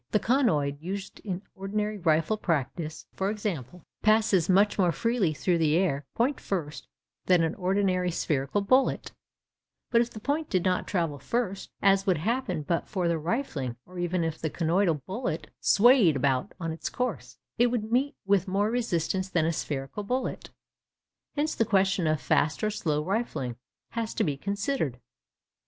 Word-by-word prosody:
The 215 - +2
conoid 155 - +1
used 195 +3 -5
in 190 -2 -5
ordinary 210 +2 -3
rifle 165 +4 +2
practice, 160 -3 -2
for 190 +1 -1
example, 180 - -4 0.2
passes 215 -5 +3
much 200 +3 +4
more 180 -3 +4
freely 230 -1 +1
through 170 +3 0
the 155 -1 +3
air, 145 -7 0
point 255 +4 +1
first, 160 -6 -4 0.4
than 180 -2 +5
an 160 - 0
ordinary 185 -1 +1
spherical 150 +2 0
bullet; 255 +7 +2 0.8
but 235 - +5
if 240 - -1
the 215 - -9
point 290 +6 -1
did 185 -2 +1
not 185 -1 +1
travel 165 -7 -1
first, 200 - -2
as 195 0 +4
would 185 - +3
happen 200 - -1
but 170 +3 -1
for 185 -4 -1
the 170 -1 +1
rifling, 155 - -2
or 180 0 -9
even 175 0 0
if 160 -1 -3
the 160 - -2
conoidal 165 -2 +1
bullet 175 -8 -4
'swayed 220 - +5
about' 135 -1 0
on 165 -2 -2
its 160 - -4
course, 250 -1 -3 0.2
it 240 - +6
would 230 -2 -2
meet 265 +4 +1
with 195 -1 +2
more 200 +3 +1
resistance 190 -5 -1
than 165 -4 +1
a 165 - +1
spherical 145 +4 -4
bullet. 250 +6 -3 0.9
Hence 305 +1 0
the - - +2
question 195 -5 +2
of 155 -1 +1
'fast 145 +5 +1
or 215 - +2
slow 155 -8 -1
rifling' 190 - -2 0.3
has 230 -1 -3
to - - +1
be 145 -4 0
considered. 200 - -2
185 Hz, 165 wpm, -28 LUFS, 160-215 Hz, 0.9 s, it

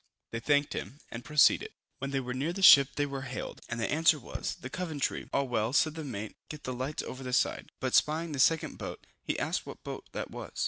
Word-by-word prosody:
They 115 - -3
thanked 145 +3 +2
him, 140 - -5
and 115 +1 -6
proceeded. 150 +1 +4 0.3
When 135 - -3
they 135 0 0
were 125 -1 -4
near 140 +7 -1
the 195 +1 -4
ship 140 -6 +10
they 145 - +1
were 140 -1 -5
hailed, 130 -1 -6
and 115 - -3
the 115 - -1
answer 160 +1 +4
was, 130 - -5
the - - -8
Coventry. 160 -6 -2
"All 140 -1 +1
well," 115 -1 0
said 155 +2 +3
the 160 0 -6
mate, 110 -6 -6
"get 150 -1 -8
the 130 - -3
lights 130 +4 -3
over 130 - -7
the 125 -1 -5
side;" - - +1
but - - -2
spying 160 +2 +3
the 140 - -4
second 160 +4 +2
boat, - - -7 0.2
he - - -2
asked - - -1
what - - -9
boat - - -7
that - - -4
was? - - -8
140 Hz, 235 wpm, -30 LUFS, 125-150 Hz, 0.3 s, ship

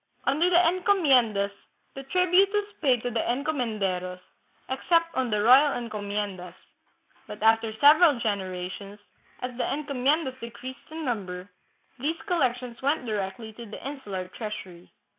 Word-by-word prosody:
Under 305 +6 +2
the 360 - +2
encomiendas 275 - +3 0.4
the 270 - -7
tribute 365 +6 +3
was 415 -1 0 0.2
paid 255 -6 +2
to 245 - -2
the 230 - -1
encomenderos, 215 -10 -2 0.5
except 335 +5 +1
on 260 -2 0
the 210 -1 0
royal 265 +5 +6
encomiendas; 205 -5 -4 0.7
but 210 0 -8
after 225 0 +4
several 290 +3 +6
generations, 195 -1 -4 0.5
as 250 -1 -4
the - - 0
encomiendas 280 0 0
decreased 255 +5 -9
in 315 0 -6
number, 185 -6 -4 0.5
these 315 +6 -2
collections 250 - -1
went 280 0 0
directly 215 0 -4
to 235 +2 -10
the 210 - -10
insular 205 -10 -5
treasury. 185 -5 -8
245 Hz, 130 wpm, -26 LUFS, 205-290 Hz, 0.7 s, royal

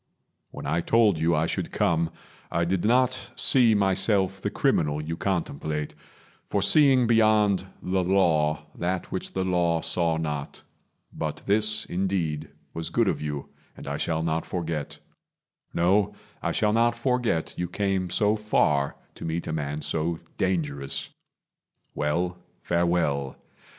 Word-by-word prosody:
When - - -9
I 80 +4 0
told 105 -4 +3
you 85 +1 +2
I 75 +1 +1
should - - -3
come, 85 -1 +1 0.4
I 85 +1 +1
did 90 0 -1
not 130 +2 +2
see 120 -4 +4
myself 95 -1 +2
the - - -1
criminal 75 -1 +1
You 80 +2 -4
contemplate, 80 -5 -2 0.5
for 100 - 0
seeing 135 0 +6
beyond 110 -4 +3 0.2
the 95 0 0
Law 80 -5 +2
That 90 +1 -3
which - - -4
the 95 - -1
Law 85 -3 +1
saw 85 -2 +1
not. 75 -3 -4 0.5
But - - -4
this, 110 +1 +2
indeed, 85 -5 -2 0.2
Was 80 0 -4
good - - +1
of - - 0
you, 75 -2 -4 0.3
and - - -10
I 70 +1 -2
shall 80 +1 -1
not 80 0 0
forget; 80 -4 -4 0.7
No, 95 +4 +2 0.3
I - - -1
shall 105 0 +1
not 115 +1 +3
forget 120 -8 0
you 90 - -2
came 95 0 -1
so 105 +4 +2
far 75 -10 +1 0.2
To - - -11
meet 80 +1 -2
a - - -3
man 75 -1 -3
so 80 +1 -1 0.2
dangerous. 75 -7 -1 0.8
Well, 90 +5 -1 0.2
farewell. 85 -6 0
85 Hz, 140 wpm, -26 LUFS, 80-100 Hz, 0.8 s, seeing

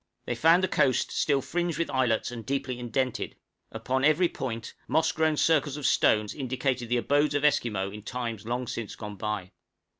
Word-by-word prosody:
They - - -1
found 165 +9 +4
the - - +3
coast 130 - +2
still 140 -2 +1
fringed 175 -1 -1
with 170 - -1
islets, 125 -4 +1
and 115 -2 -7
deeply 135 0 -2
indented; 125 +1 -2 0.4
upon 130 +4 -2
every 155 +5 +4
point, 115 -3 -5
moss 160 0 +2
grown 160 -1 +1
circles 150 -3 +2
of 145 - -5
stones 105 -1 +3
indicated 130 -2 -2
the 125 - +2
abodes 145 +4 +2
of 145 +1 +1
Esquimaux 110 -9 +1
in 105 +1 -8
times 115 -1 -4
long 125 +1 -2
since 115 -2 -5
gone 105 -2 -8
by. 105 -2 -3
130 Hz, 180 wpm, -28 LUFS, 115-150 Hz, 0.4 s, found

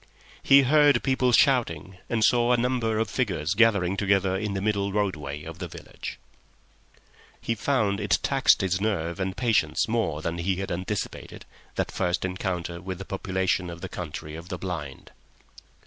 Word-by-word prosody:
He 140 0 +6
heard 145 -1 +4
people 130 -2 +2
shouting, 95 - +2
and 115 -2 +1
saw 120 +1 +4
a - - +3
number 120 -2 0
of 110 0 0
figures 95 - -1
gathering 100 -4 +3
together 100 -1 +1
in 100 0 -2
the - - -1
middle 100 -1 0
roadway 75 -8 -2
of 80 +1 -9
the 90 - -4
village. - - -9 1.2
He 115 - -1
found 110 -3 0
it 100 -4 +2
tax 135 -1 +4
his 95 -1 0
nerve 85 -6 -1
and 95 0 -2
patience 115 -5 +1
more 100 -10 -1
than 85 +1 -2
he 95 +2 0
had 95 +1 -4
anticipated, 95 +4 -4 0.3
that - - -1
first 90 0 -1
encounter 90 -2 -3
with 95 -1 -5
the 95 - -8
population 95 -2 -1
of 85 -1 -8
the - - -5
Country 75 0 -6
of 85 +3 -9
the 90 - -4
Blind. 80 -7 -6
95 Hz, 165 wpm, -26 LUFS, 90-115 Hz, 1.2 s, He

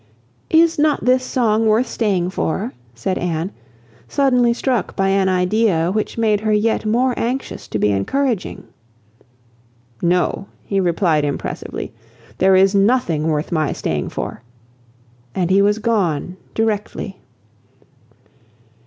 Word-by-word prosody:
"Is 325 0 +4
not 300 -1 +2
this 255 0 +3
song 225 -4 +1
worth 220 +4 +3
staying 195 -7 -1
for?" 195 +6 -2 0.2
said 185 +11 -2
Anne, 175 +1 -2 0.6
suddenly 250 - +3
struck 245 -1 -1
by 195 0 +1
an 195 -1 +2
idea 180 -2 +2
which 215 +3 -2
made 215 -2 +2
her 215 0 -1
yet 215 +1 +1
more 245 +4 +2
anxious 255 +3 -3
to - - -3
be 105 0 +2
encouraging. 225 - -1 1.4
"No!" 180 +3 +1 0.2
he 195 - -1
replied 170 -4 +2
impressively, 145 -1 -4 0.5
"there 190 0 +5
is 190 +1 +4
nothing 195 -7 +2
worth 155 -1 -1
my 155 -3 0
staying - - -2
for;" - - -5 0.9
and 180 -1 0
he 195 +1 +5
was 205 +1 +3
gone 190 -7 0 0.2
directly. 210 -3 -2
200 Hz, 125 wpm, -19 LUFS, 180-230 Hz, 1.4 s, there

